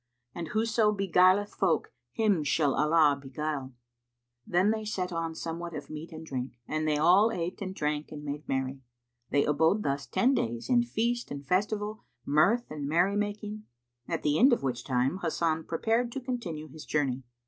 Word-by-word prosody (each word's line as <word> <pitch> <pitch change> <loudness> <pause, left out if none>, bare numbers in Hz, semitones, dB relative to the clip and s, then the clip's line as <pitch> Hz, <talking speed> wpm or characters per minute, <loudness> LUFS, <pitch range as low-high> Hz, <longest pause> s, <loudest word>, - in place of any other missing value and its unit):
and 170 -2 -5
whoso 220 +3 +2
beguileth 195 +1 +3
folk, 160 - 0 0.2
him 205 -8 +2
shall 145 -1 +2
Allah 150 -2 +3
begule."[FN#182] 135 -1 -4 0.7
Then 185 +4 +3
they 220 0 -2
set 185 -4 -3
on 165 -1 -2
somewhat 170 +1 -5
of - - -7
meat 155 +3 -7
and 160 0 -8
drink, 130 -3 -4
and 155 0 -1
they 150 -1 +2
all 185 +8 +5
ate 175 -1 -4
and 190 -1 -4
drank 150 -1 -2
and 150 -1 -7
made 145 +1 -6
merry. 135 0 -2 0.5
They 140 0 +2
abode 160 +8 +2
thus 140 0 -2
ten 260 +3 +2
days 120 - -2
in 245 -1 +5
feast 240 0 -1
and 140 -1 -7
festival, 210 +3 -1 0.2
mirth 200 +12 +3
and 145 -2 -4
merry 175 +6 +3
making, 210 +1 -3 0.4
at - - -2
the 150 0 +2
end 265 +3 +7
of 235 - 0
which 125 -3 -2
time 130 +6 0
Hasan 160 -1 0
prepared 230 +8 0
to 270 - -3
continue 235 -12 -4
his 155 +2 -11
journey. 135 -4 0
165 Hz, 175 wpm, -29 LUFS, 150-210 Hz, 0.7 s, end